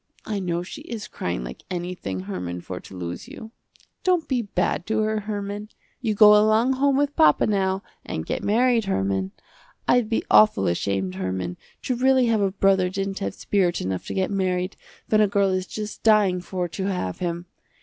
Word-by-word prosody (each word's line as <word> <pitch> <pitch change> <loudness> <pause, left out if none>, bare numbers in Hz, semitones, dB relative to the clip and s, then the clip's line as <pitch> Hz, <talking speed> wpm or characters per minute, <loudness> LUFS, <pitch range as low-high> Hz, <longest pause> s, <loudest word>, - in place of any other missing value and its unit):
I 210 -2 -2
know 175 -2 -2
she 185 - -9
is 230 -9 -6
crying 85 -9 -4
like - - -8
anything 175 - -4
Herman 90 -2 -5
for 90 +1 -6
to 95 - -12
lose 85 -1 -6
you. 220 - -10 0.5
Don't 360 -3 +2
be 255 -3 +1
bad 180 -4 -1
to 220 0 +1
her 215 0 0
Herman. 205 0 -5 0.3
You 220 -4 0
go 210 0 +8
along 215 +4 +4
home 275 +1 +2
with 285 0 0
papa 155 -2 +5
now 195 -1 0 0.2
and 80 - -4
get - - -3
married 235 +1 +3
Herman. 95 - -1 0.6
I'd 245 -3 +3
be 225 - 0
awful 105 -2 +6
ashamed 95 +1 -1
Herman, 95 -1 -3 0.3
to 255 - 0
really 260 +1 +4
have 225 -3 +2
a 195 - +2
brother 190 -1 +2
didn't 195 +1 -3
have 195 - -3
spirit 185 -4 0
enough 95 0 -3
to - - -4
get 190 +1 0
married, 185 -1 -1 0.3
when 215 -1 +3
a 210 - +5
girl 200 -1 +2
is 185 0 -1
just 215 0 -6
dying 205 -5 +4
for 180 0 -3
to 190 +3 -4
have 135 - -3
him. 175 0 -3
195 Hz, 190 wpm, -24 LUFS, -, 0.6 s, go